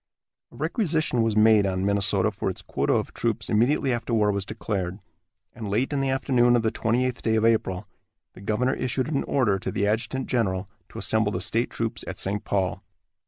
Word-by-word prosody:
A - - -16
requisition 155 - 0
was 115 -2 +1
made 110 -2 +5
on 95 0 -1
Minnesota 100 -1 +2
for - - -3
its - - -6
quota - - 0
of - - -1
troops - - -2
immediately 130 +4 +2
after 115 0 -2
war 105 -2 +3
was 100 -1 -3
declared, 100 -4 -3 0.6
and 110 -3 -6
late 120 +8 0
in 140 - 0
the 135 - 0
afternoon 125 -2 +3
of 120 - +2
the 110 - +1
twenty 120 +3 0
eighth 125 -1 -3
day 110 -1 +1
of 110 0 +2
April 95 -5 +1 0.5
the - - -13
governor 115 +6 0
issued 130 +2 -2
an 140 - 0
order 105 -8 +1
to 95 - -4
the 100 - 0
adjutant 115 +5 -1
general 95 -6 -1 0.2
to - - -11
assemble 110 -2 +1
the 90 - -2
state 115 +5 0
troops 115 0 -3
at 95 - -5
St. 100 +1 -1
Paul. 95 -2 -1
110 Hz, 205 wpm, -25 LUFS, 100-125 Hz, 0.6 s, made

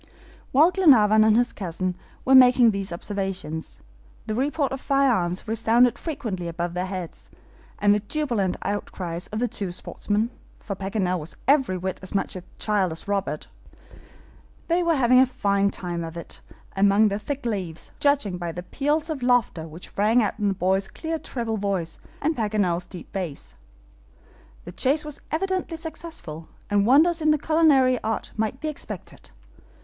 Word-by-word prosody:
While 310 +7 +6
Glenarvan 220 - +6
and 220 0 +5
his 245 0 +1
cousin 185 -1 -3 0.3
were 265 - +4
making 250 -2 +7
these 195 -2 -3
observations, 185 -3 -4 0.4
the 215 - -3
report 280 +4 0
of 270 0 -4
firearms 235 -10 +1
resounded 230 +2 +3
frequently 215 - -4
above 170 +1 -3
their 180 +1 -2
heads, 185 -3 -7 0.5
and 205 0 +4
the 210 - +2
jubilant 220 -5 -1
outcries 180 -3 -4
of 215 - -5
the 245 +2 +1
two 200 -6 -3
sportsmen 210 +5 -2 0.3
for 200 - -6
Paganel 190 -2 -1
was 155 +2 -9
every 265 -9 +3
whit 185 +1 -4
as 190 +2 -8
much 195 - 0
a 185 - -5 0.2
child 205 -5 +1
as 160 - -7
Robert. 200 -1 -2 1.2
They 340 +2 +3
were 335 -2 +2
having 255 -2 +5
a 260 - +6
fine 200 -5 +1
time 175 -3 -4
of 165 0 -7
it 170 - -9 0.3
among 200 +2 +4
the 200 +1 -2
thick 275 +4 -5
leaves, 185 -8 -4
judging 270 -11 +1
by 170 -1 -4
the 180 - -6
peals 295 - -1
of 290 -4 -4
laughter 245 -10 +1
which 165 +3 -11
rang 225 +4 +4
out 210 - -2
in 205 - +1
the 195 - +1
boy's 190 +1 +1
clear 325 +5 -4
treble 230 -5 -3
voice 195 -5 -2 0.2
and 315 +2 +1
Paganel's 200 -6 0
deep 180 -4 -10
bass. 155 - -5 1.1
The - - -8
chase 295 +4 +1
was 300 -2 -7
evidently 370 0 -2
successful, 320 - -7 0.2
and 205 0 +3
wonders 320 +6 +5
in 305 0 +4
culinary 290 -5 +4
art 225 +1 -2
might 220 +4 -2
be 310 - -4
expected. 220 - -7
210 Hz, 165 wpm, -24 LUFS, 185-265 Hz, 1.2 s, making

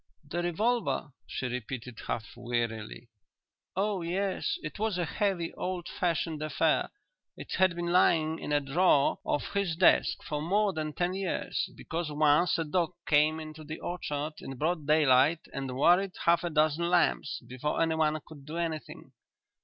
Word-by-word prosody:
"The 175 +4 -2
revolver?" 175 -1 0 0.2
she - - -4
repeated 125 -1 -5
half 110 - -4
wearily; 120 -1 -3 0.7
"oh 200 0 0
yes. 195 - -1
It - - -6
was 215 -3 0
a 175 - 0
heavy, 180 -1 -1
old 180 -2 -4
fashioned 165 -3 -1
affair. 155 +1 +1 0.5
It - - -9
had 185 -2 +4
been 175 0 -2
lying 160 -3 +3
in - - -5
a 145 - +4
drawer 145 +1 +3
of 145 - -2
his 200 -5 0
desk 180 +2 +4
for 150 -1 -3
more 200 +5 +2
than 155 -1 -3
ten 175 +3 0
years 190 -1 -2
because 165 -1 -4
once 150 +4 +3
a 165 - 0
dog 175 +2 0
came 150 +1 +3
into 155 0 -8
the 155 +1 -7
orchard 150 -3 -3
in 135 - -7
broad 155 +1 -1
daylight 150 0 +4
light - - -16
and 135 -2 -4
worried 180 +6 +4
half 170 0 +4
a 175 - -1
dozen 155 +2 +2
lambs 175 -5 +2
before 130 +4 -2
anyone 160 -1 +2
could 150 -3 -12
do 155 +4 -6
anything." 165 -3 -4
160 Hz, 160 wpm, -29 LUFS, 145-175 Hz, 0.7 s, had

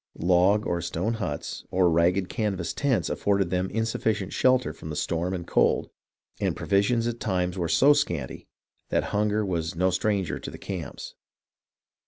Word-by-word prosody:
Log 90 +4 +3
or 85 0 -1
stone 90 +6 -2
huts 90 -10 -4
or 90 -1 +3
ragged 85 +3 +2
canvas 95 -5 -2
tents 130 - +1
afforded 100 -3 0
them 90 +1 0
insufficient 110 -2 -1
shelter 130 -1 +2
from 80 -1 -7
storm 85 +4 -1
and 90 -2 -4
cold, - - +2 0.5
and - - 0
provi 100 0 +2
sions 115 +3 +1
at 120 0 -3
times 90 -3 -1
were 85 -3 -2
so 140 - +6
scanty 85 - -2 0.4
that - - +1
hunger 105 +1 +1
was 85 -2 -2
no 90 +2 +2
stranger 95 0 0
to - - -7
the - - -9
camps. 90 -7 -6
95 Hz, 160 wpm, -26 LUFS, 85-105 Hz, 0.5 s, so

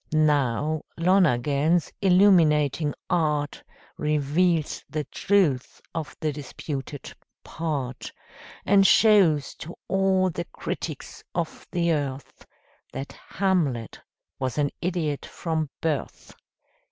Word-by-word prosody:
Now, 150 -1 +2 0.2
Lonergan's 160 -3 +2
illuminating 165 -7 +4
art 150 -4 0 0.4
Reveals 150 +2 +1
the 155 -1 -2
truth 160 -8 0
of 160 -2 -5
the 155 -1 0
disputed 145 0 -6 0.3
"part," 135 -7 -4 0.5
And 195 -1 +5
shows 190 -10 +5
to 170 - -8
all 190 -1 +2
the 170 +1 -4
critics 155 -4 -6
of 170 -2 -4
the 170 -1 +1
earth 140 -4 -4 0.4
That 135 - -6
Hamlet 160 - -1 0.4
was 130 0 -2
an 145 -1 +1
idiot 165 -5 -1
from 160 -3 -3
birth! 155 -4 -3
155 Hz, 95 wpm, -25 LUFS, 145-175 Hz, 0.5 s, And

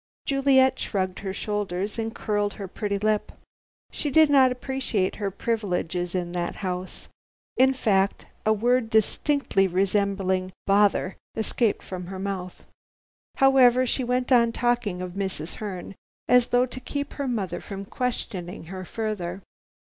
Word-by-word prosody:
Juliet 265 -1 +4
shrugged 185 -2 -2
her 195 -1 -4
shoulders 205 0 -2
and 225 0 -3
curled 205 -1 -1
her 200 -2 -6
pretty 200 +2 -2
lip. 215 +1 0 0.6
She 295 - -1
did 310 +1 +5
not 265 -2 +6
appreciate 250 -6 -1
her 205 -2 -1
privileges 185 -4 -2
in 175 -1 -2
that 175 -1 -2
house. 185 0 -4 0.5
In 265 +1 +5
fact, 200 -5 +1 0.2
a 215 - +3
word 235 +2 +2
distinctly 220 -1 +2
resembling 190 0 0
"Bother!" 200 -1 +3 0.2
escaped 220 0 0
from 180 -2 -6
her 190 +1 -6
mouth. 185 -2 -5 0.7
However, 255 -2 +5
she 255 +1 0
went 250 +1 -1
on 235 -2 +5
talking 230 -6 0
of 180 - -5
Mrs. 190 -4 -4
Herne, 195 -4 -6 0.3
as 250 -1 +5
though 245 +1 +3
to 255 0 -7
keep 285 +2 -4
her 280 -2 -3
mother 215 -7 -2
from 195 -1 -7
questioning 195 -8 -4
her 185 0 -5
further. 195 -3 -4
205 Hz, 140 wpm, -25 LUFS, 185-245 Hz, 0.7 s, not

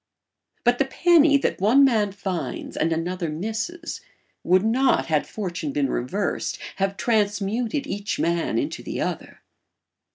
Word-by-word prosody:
But 245 0 +3
the 275 - +3
penny 315 0 +5
that 275 - -2
one 240 +8 +5
man 215 -6 +2
finds 190 -3 -4
and 165 - 0
another 170 +1 -2
misses 225 - -4 0.4
would 185 +3 +3
not, 255 +4 +3
had 155 -2 0
fortune 175 -7 -4
been 140 -1 0
reversed, 190 +12 -2 0.2
have 195 0 -1
transmuted 220 +3 0
each 205 +1 -3
man 170 -8 0
into - - -2
the - - -5
other. - - -4
205 Hz, 135 wpm, -24 LUFS, 175-245 Hz, 0.4 s, penny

